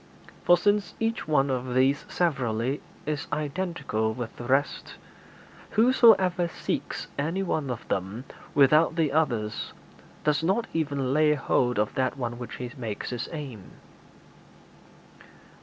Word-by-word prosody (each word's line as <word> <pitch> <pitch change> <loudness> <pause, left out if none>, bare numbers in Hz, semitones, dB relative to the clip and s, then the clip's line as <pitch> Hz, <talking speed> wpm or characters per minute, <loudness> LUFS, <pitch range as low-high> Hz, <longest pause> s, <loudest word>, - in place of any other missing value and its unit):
For 175 - +7
since 205 +1 +1
each 225 -4 -1
one 140 -3 +2
of 125 -1 -2
these 135 +2 +3
severally 130 -5 0 0.2
is 150 -1 -3
identical 145 - -2
with 120 -2 -6
the 120 - -8
rest, 135 +4 0 0.8
whosoever 215 -7 +5
seeks 170 - -4
any 165 +7 -1
one 155 -6 -1
of 120 -2 -5
them 95 +6 -3 0.3
without 150 +4 +5
the 160 -4 +1
others 120 -9 -1 0.5
does 150 0 +2
not 195 +7 +1
even 140 -5 -1
lay 150 0 +4
hold 125 -4 +1
of 105 0 0
that 130 +1 0
one 120 -2 -4
which 120 - -7
he 125 -1 -6
makes 115 -5 -5
his 120 0 -4
aim.' 135 - -8
140 Hz, 130 wpm, -27 LUFS, 125-165 Hz, 0.8 s, For